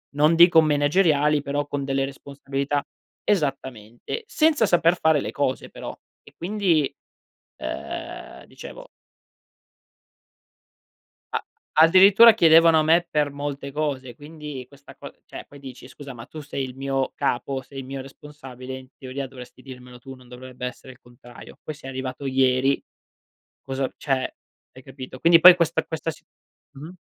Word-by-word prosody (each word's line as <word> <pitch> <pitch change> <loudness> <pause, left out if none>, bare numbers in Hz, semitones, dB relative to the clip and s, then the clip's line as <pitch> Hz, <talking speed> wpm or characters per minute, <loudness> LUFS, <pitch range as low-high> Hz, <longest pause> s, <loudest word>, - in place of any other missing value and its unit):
non 150 +3 +3
dico 170 0 +7
menageriali 150 0 +2
però 145 +1 -2
con 145 -1 -4
delle 135 0 -1
responsabilità. 140 +1 -4 0.4
Esattamente, 135 - -3
senza 310 - +2
saper 175 -2 +3
fare 160 -3 +2
le - - -5
cose 135 -2 -2
però. - - -9 0.3
E - - -18
quindi, 175 -6 0 0.7
ehm, - - -7
dicevo - - -12 2.5
A - - -2 0.4
addirittura 195 +6 +7
chiedevano 165 -4 +6
a - - +2
me 165 +3 +3
per 150 -3 0
molte 140 0 -6
cose, 135 -4 -3
quindi 150 -3 -9
questa 140 0 -17
co - - -10
cioè - - -9
poi 145 - -14
dici: 130 -2 -11
“Scusa 140 +1 -11
ma 115 -1 -11
tu 155 - -10
sei 140 -2 -5
il 130 -1 -8
mio 135 0 -2
capo, 130 +2 -2
sei 135 +2 -12
il 135 - -6
mio 135 +1 -6
responsabile, 130 -2 -10
in 130 0 -12
teoria 135 +1 -6
dovresti 130 0 -13
dirmelo 125 -2 -12
tu, 135 +1 -10
non 130 -1 -18
dovrebbe 125 0 -8
essere 130 +1 -9
il 125 - -19
contrario. 120 0 -15
Poi 155 - -6
sei 140 -2 -11
arrivato 130 +1 -6
ieri, 130 0 +2 0.8
cosa 135 0 -3
"cioè 135 -2 -2 0.4
hai 130 - -14
capito? 130 0 -10
Quindi 165 +3 +5
poi 180 +2 +10
questa 170 -2 0
questa 160 0 -4
si 155 - -14 0.5
mh-mh, 145 +3 -10
140 Hz, 150 wpm, -23 LUFS, 130-155 Hz, 2.5 s, poi